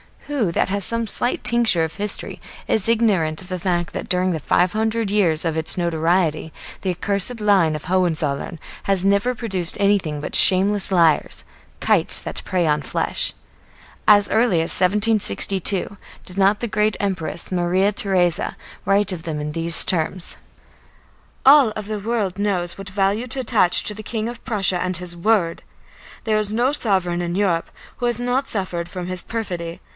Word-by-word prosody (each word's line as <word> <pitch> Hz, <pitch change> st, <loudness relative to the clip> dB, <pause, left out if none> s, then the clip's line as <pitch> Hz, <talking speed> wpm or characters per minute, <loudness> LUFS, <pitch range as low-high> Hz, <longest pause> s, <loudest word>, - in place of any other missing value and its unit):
Who 275 Hz, -, -1 dB
that -, -, 0 dB
has 200 Hz, +1 st, -1 dB
some 230 Hz, 0 st, -1 dB
slight 245 Hz, +3 st, -1 dB
tincture 235 Hz, -8 st, +3 dB
of 160 Hz, 0 st, -4 dB
history 205 Hz, 0 st, -5 dB, 0.3 s
is 220 Hz, -2 st, 0 dB
ignorant 195 Hz, -9 st, +1 dB
of 185 Hz, -, -13 dB
the 185 Hz, -1 st, -4 dB
fact 175 Hz, -1 st, -2 dB
that -, -, -6 dB
during 185 Hz, 0 st, +1 dB
the 160 Hz, -, -2 dB
five 175 Hz, +4 st, +1 dB
hundred 220 Hz, -1 st, -1 dB
years 175 Hz, -7 st, +2 dB
of 160 Hz, -1 st, -1 dB
its 160 Hz, +2 st, +1 dB
notoriety 165 Hz, -1 st, 0 dB, 0.3 s
the 190 Hz, -, -1 dB
accursed 200 Hz, +6 st, -2 dB
line 190 Hz, -7 st, +3 dB
of 150 Hz, -, -7 dB
the -, -, -11 dB
Hohenzollern 165 Hz, -4 st, 0 dB, 0.3 s
has 195 Hz, -2 st, +1 dB
never 200 Hz, +6 st, +2 dB
produced 190 Hz, -8 st, -3 dB
anything 195 Hz, -7 st, +1 dB
but -, -, -6 dB
shameless 195 Hz, +1 st, +6 dB
liars, 170 Hz, -4 st, +2 dB, 0.4 s
kites -, -, +4 dB
that -, -, -7 dB
prey 180 Hz, -2 st, 0 dB
on 150 Hz, -1 st, +1 dB
flesh. 135 Hz, -, -1 dB, 0.7 s
As 205 Hz, -1 st, +5 dB
early 220 Hz, -7 st, +2 dB
as 165 Hz, -, -2 dB
1762 200 Hz, -, +1 dB, 0.3 s
did 180 Hz, -, -12 dB
not 200 Hz, +1 st, +2 dB
the 240 Hz, -, -1 dB
great 210 Hz, 0 st, 0 dB
Empress 185 Hz, -4 st, -4 dB
Maria 185 Hz, +3 st, +1 dB
Theresa 185 Hz, -4 st, 0 dB, 0.3 s
write 200 Hz, 0 st, +2 dB
of 175 Hz, -3 st, -6 dB
them 160 Hz, -3 st, -4 dB
in 150 Hz, 0 st, -4 dB
these 165 Hz, +1 st, +4 dB
terms: 175 Hz, +1 st, -1 dB, 1.1 s
"All 270 Hz, -5 st, +6 dB
the 215 Hz, 0 st, -5 dB
world 205 Hz, -3 st, -2 dB
knows 185 Hz, -4 st, -1 dB
what 195 Hz, -1 st, -8 dB
value 200 Hz, +5 st, 0 dB
to 260 Hz, +2 st, -4 dB
attach 220 Hz, -7 st, +3 dB
to 210 Hz, -, -1 dB
the 215 Hz, -, -9 dB
King 220 Hz, +1 st, -4 dB
of 240 Hz, 0 st, -10 dB
Prussia 195 Hz, -7 st, +2 dB
and 185 Hz, -1 st, -1 dB
his 175 Hz, 0 st, -5 dB
word. 175 Hz, -2 st, 0 dB, 0.6 s
There 215 Hz, -1 st, +1 dB
is 210 Hz, -1 st, +2 dB
no 240 Hz, +5 st, +1 dB
sovereign 190 Hz, -10 st, 0 dB
in 175 Hz, 0 st, -3 dB
Europe 185 Hz, -4 st, 0 dB, 0.3 s
who 245 Hz, -, -3 dB
has 240 Hz, -2 st, 0 dB
not 245 Hz, +3 st, -1 dB
suffered 180 Hz, -4 st, -2 dB
from 180 Hz, -1 st, -6 dB
his 185 Hz, -1 st, -3 dB
perfidy. 175 Hz, -7 st, -5 dB
190 Hz, 170 wpm, -21 LUFS, 175-215 Hz, 1.1 s, shameless